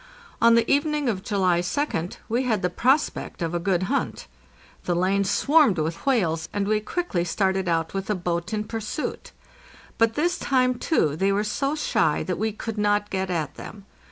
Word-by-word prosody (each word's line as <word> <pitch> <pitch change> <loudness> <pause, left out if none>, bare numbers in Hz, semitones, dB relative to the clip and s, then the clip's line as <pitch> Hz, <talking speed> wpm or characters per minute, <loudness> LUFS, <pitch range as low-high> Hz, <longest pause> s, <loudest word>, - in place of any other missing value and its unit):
On 230 0 +6
the 230 0 +3
evening 295 0 +1
of 200 -5 -1
July 190 -4 +1
2d 180 - -2
we 235 +3 0
had 225 -7 0
the 180 - +1
prospect 265 - 0
of 165 0 -2
a 175 - 0
good 185 0 0
hunt. 185 - -2 0.6
The 175 - 0
lane 190 +3 +2
swarmed 280 - +3
with 160 - -3
whales, 165 -11 +1
and 205 -1 -1
we 215 0 +2
quickly 215 - -2
started 190 +1 0
out 165 -1 0
with 195 -1 -3
the 210 - 0
boat 175 0 -3
in 210 -1 -1
pursuit. 225 +6 -5 0.7
But 230 0 +3
this 345 +4 0
time, 255 -2 +1
too, 155 - +1
they 195 +5 +1
were 200 +1 +1
so 275 +7 -1
shy 160 - +1
that 180 -2 -3
we 220 +1 0
could 215 +1 -5
not 205 0 +1
get 190 -1 -2
at 155 -5 -2
them. 200 -2 -10
205 Hz, 185 wpm, -24 LUFS, 180-235 Hz, 0.7 s, On